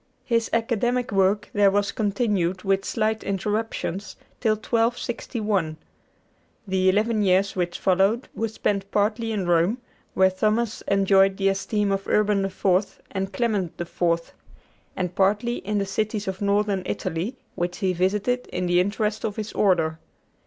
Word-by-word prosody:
His 230 -3 +1
academic 240 +2 0
work 200 +1 +2
there 205 -1 +5
was 200 0 +1
continued, 200 -4 0
with 195 -1 +1
slight 220 0 -1
interruptions, 205 0 -3 0.2
till 220 -3 +2
1261. 220 -6 -1 0.9
The 190 0 +2
eleven 215 +3 +2
years 195 0 +2
which 175 -2 -1
followed 195 +6 +2
were 225 - -1
spent 200 -2 -2
partly 215 +3 0
in 205 -4 -1
Rome, 175 +6 +2 0.4
where 190 0 +5
Thomas 215 +4 0
enjoyed 195 -1 +4
the 195 0 +2
esteem 200 +1 0
of 195 0 -2
Urban 210 -2 +2
IV. 195 0 0
and 195 0 -3
Clement 200 -4 -1
IV., 170 -1 -1 0.6
and 180 -1 -2
partly 205 +6 +1
in 210 +2 -2
the 200 - 0
cities 210 +1 -2
of 190 0 -4
Northern 200 -1 +1
Italy, 185 +11 -3 0.2
which 175 +1 -3
he 190 -3 0
visited 210 +8 0
in 180 - -3
the 175 0 +3
interest 210 +3 0
of 210 -2 -2
his 215 -1 -5
Order. 165 -5 +2
200 Hz, 145 wpm, -24 LUFS, 190-215 Hz, 0.9 s, there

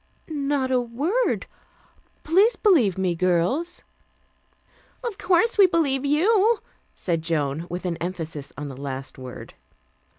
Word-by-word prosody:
"Not 280 -2 0
a 250 -1 +3
word. 295 - -1 0.8
Please 390 +9 +4
believe 270 - +3
me, 185 -2 +1
girls." 185 - 0 1.2
"Of 455 -5 -4
course 380 +4 +2
we 390 - +9
believe 285 -6 +1
you," 415 +9 +3 0.4
said 170 -3 -1
Joan, 160 -1 -2
with 180 +2 -5
an 170 -2 -2
emphasis 160 -5 -5
on 145 +1 -5
the 135 - -7
last 135 -1 -6
word. 130 -1 -9
245 Hz, 125 wpm, -24 LUFS, -, 1.2 s, we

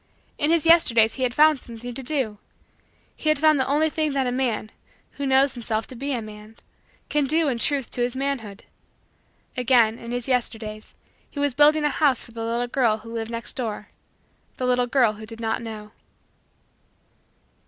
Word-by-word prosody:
In 295 - +2
his 330 -1 +2
Yesterdays 235 -10 +5
he 265 - -6
had 250 -1 0
found 305 -1 +5
something 240 +1 -9
to 270 - -5
do. 255 -6 -2 0.8
He 310 - -1
had 305 - +3
found 310 0 +4
the 260 - +1
only 295 +3 +2
thing 310 -1 -1
that 270 -1 0
a 250 - -1
man, 245 -4 -2 0.4
who 280 - -4
knows 265 +1 +3
himself 225 -2 -2
to 255 - -12
be 275 +4 -4
a 240 -4 -2
man, 215 +1 -12 0.5
can 295 -1 +1
do 315 +3 +2
in 245 -4 -1
truth 275 0 0
to 245 - -3
his 245 +1 0
manhood. 260 -7 -4 0.9
Again, 240 -3 +3
in 235 0 -8
his 245 0 -3
Yesterdays, 225 -4 -3 0.3
he 285 - -8
was 285 -2 +1
building 295 +2 +4
a 295 - +3
house 285 -4 +1
for - - -14
the 225 0 -6
little 235 +2 -1
girl 240 -3 +1
who 230 +1 -11
lived 225 -1 -4
next 230 0 -5
door 220 -5 -4 0.7
the 255 - -2
little 250 0 +2
girl 240 -4 +3
who 215 +1 -11
did 225 0 -10
not 225 0 -2
know. 215 -2 -8
245 Hz, 190 wpm, -24 LUFS, 225-280 Hz, 0.9 s, Yesterdays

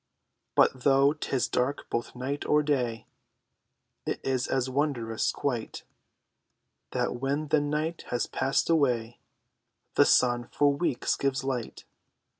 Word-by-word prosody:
But 130 - +4
though 140 +2 +4
'tis 140 -4 -1
dark 130 +3 -1
both 120 - -3
night 135 +3 -3
or 150 0 +3
day 125 -6 -1 1.0
It - - -1
is 130 -1 0
as 130 -1 0
wondrous 130 -5 0
quite 120 -6 -3 1.1
That - - -1
when 140 +4 -2
the 150 - +3
night 150 +3 -2
has 120 - 0
passed 135 +1 0
away, 125 -8 +1 0.7
The - - +5
sun 120 -1 +3
for 145 -1 +2
weeks 140 -3 0
gives 135 -1 -1
light. 130 -4 -4
135 Hz, 125 wpm, -28 LUFS, 125-145 Hz, 1.1 s, The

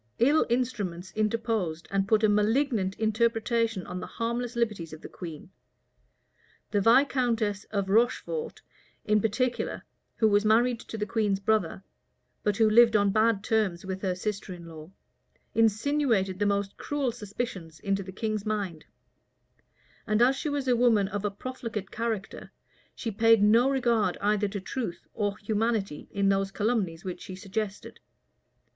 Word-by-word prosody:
III 285 +6 +5
instruments 205 -8 -2
interposed, 215 -6 -1
and 195 0 +1
put 220 +1 +3
a - - +6
malignant 210 -1 +1
interpretation 225 -1 0
on 180 +1 -5
the - - -6
harmless 235 +1 -3
liberties 210 -9 -2
of 155 - -10
the - - -8
queen: 165 0 -9 1.2
the 205 - +2
viscountess 230 -4 +2
of 200 -2 -2
Rocheford, 245 - 0 0.4
in 210 0 +3
particular, 240 +4 -1 0.3
who 220 - +3
was 205 0 +3
married 230 +2 +3
to 225 - -8
the 210 - -1
queen's 210 -3 0
brother, 195 -3 0 0.6
but 205 -1 0
who 225 - +5
lived 230 +1 +6
on 200 -1 +4
bad 215 -1 +2
terms 210 -6 0
with 190 0 -4
her 185 -2 -1
sister 200 +1 -4
in 170 -1 -11
law, 160 -1 -10 0.6
insinuated 225 -3 +2
the 205 - +2
most 200 -1 -1
cruel 285 -4 -1
suspicions 200 -7 -6
into 195 +4 -1
the 190 0 -8
king's 215 +1 -2
mind; 200 -7 -3 1.2
and 215 0 +2
as 250 +3 +5
she 300 +3 -3
was 285 -2 -2
a 250 - +4
woman 230 -5 +3
of 205 -1 -4
a 205 - +1
profligate 220 -2 -6
character, 225 -3 -4 0.4
she 230 - -4
paid 225 0 +4
no 230 +5 +5
regard 235 -8 +1
either 210 0 +1
to 200 +1 -4
truth 195 -1 -5
or 205 -1 -1
humanity 210 -5 -1
in 200 -1 +1
those 195 0 +1
calumnies 195 -6 -1
which 180 -1 -5
she 185 - -8
suggested. 200 +1 -5
215 Hz, 150 wpm, -28 LUFS, 195-230 Hz, 1.2 s, a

